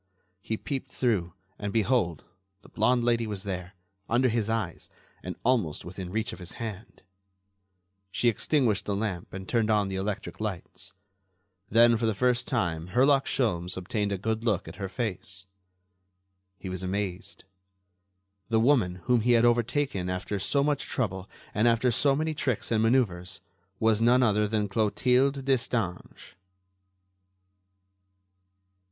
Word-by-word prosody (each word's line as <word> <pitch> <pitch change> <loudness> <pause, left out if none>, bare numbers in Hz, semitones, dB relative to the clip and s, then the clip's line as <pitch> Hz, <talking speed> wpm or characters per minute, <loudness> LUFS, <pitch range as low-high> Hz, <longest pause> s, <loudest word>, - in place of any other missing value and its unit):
He 110 +2 -3
peeped 135 0 -5
through 100 -9 0 0.3
and, 100 -1 -3
behold, 110 - +1 0.4
the - - -16
blonde 120 +3 +2
lady 115 -1 +2
was 100 -3 -5
there, 95 -1 -5 0.3
under 125 +2 +3
his 110 -2 0
eyes, 115 -1 -3 0.3
and - - -6
almost 115 -12 +1
within 90 0 -7
reach 110 +3 -2
of - - -9
his 90 -1 -6
hand. 110 -3 -7 1.1
She 120 - 0
extinguished 115 -3 +2
the 100 - -1
lamp 100 -4 -3
and 95 0 -7
turned 115 -3 +1
on 105 -2 +2
the 95 - -3
electric 100 +1 -4
lights. 105 -6 -5 0.8
Then 115 +1 +6
for 115 0 0
the 110 - 0
first 125 +3 +1
time 85 - -1
Herlock 135 +2 +4
Sholmes 90 -9 0
obtained 100 +3 -2
a 100 - 0
good 110 +3 -2
look 105 -9 0
at 80 +2 -9
her 95 -1 -4
face. 95 -2 -4 1.1
He 95 - -8
was 95 -1 -4
amazed. 95 0 -4 1.1
The 110 -1 +3
woman, 110 -8 +2
whom 125 -2 +3
he 120 +2 +3
had 115 0 +5
overtaken 120 -4 +1
after 90 +2 -3
so 140 +8 +1
much 145 -1 0
trouble 95 -6 -2 0.2
and 110 +3 +3
after 120 +1 +3
so 140 +3 +3
many 155 +2 -1
tricks 130 -7 -2
and 110 -1 +3
manœuvres, 105 -8 +1 0.4
was 110 -1 +3
none 125 +2 +5
other 105 -2 +3
than 105 -1 0
Clotilde 125 +6 +2
Destange. 115 -8 -2
110 Hz, 145 wpm, -28 LUFS, 95-120 Hz, 1.1 s, Then